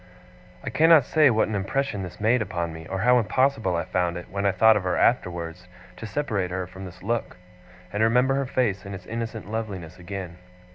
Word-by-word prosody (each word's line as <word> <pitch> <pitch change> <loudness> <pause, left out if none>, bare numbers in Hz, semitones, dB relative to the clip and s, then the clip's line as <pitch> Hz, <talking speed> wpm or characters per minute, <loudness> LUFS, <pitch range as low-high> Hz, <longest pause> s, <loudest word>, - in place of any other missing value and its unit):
I - - -4
cannot 160 -3 +6
say 155 0 +4
what 110 -2 +2
an 110 - -4
impression 105 +3 -1
this 90 -4 -8
made 115 +3 +3
upon 85 -5 -3
me, 80 0 -9
or 95 0 -3
how 125 +2 +5
impossible 115 -4 +1
I 85 - 0
found 90 -1 -1
it, 90 - -9
when 100 0 0
I - - +4
thought 110 +4 +5
of 105 - +1
her 90 -1 -1
afterwards, 90 -6 0 0.3
to 115 - -7
separate 105 -9 -2
her 90 0 -3
from 95 +2 -10
this 90 0 -12
look, 115 -1 -2 0.6
and 105 - -1
remember 125 +4 +3
her 135 -1 -1
face 115 -8 0
in 100 0 -7
its 90 -1 -10
innocent 115 -2 -5
loveliness 95 -7 -5
again. 90 -1 -7
100 Hz, 205 wpm, -25 LUFS, 90-115 Hz, 0.6 s, cannot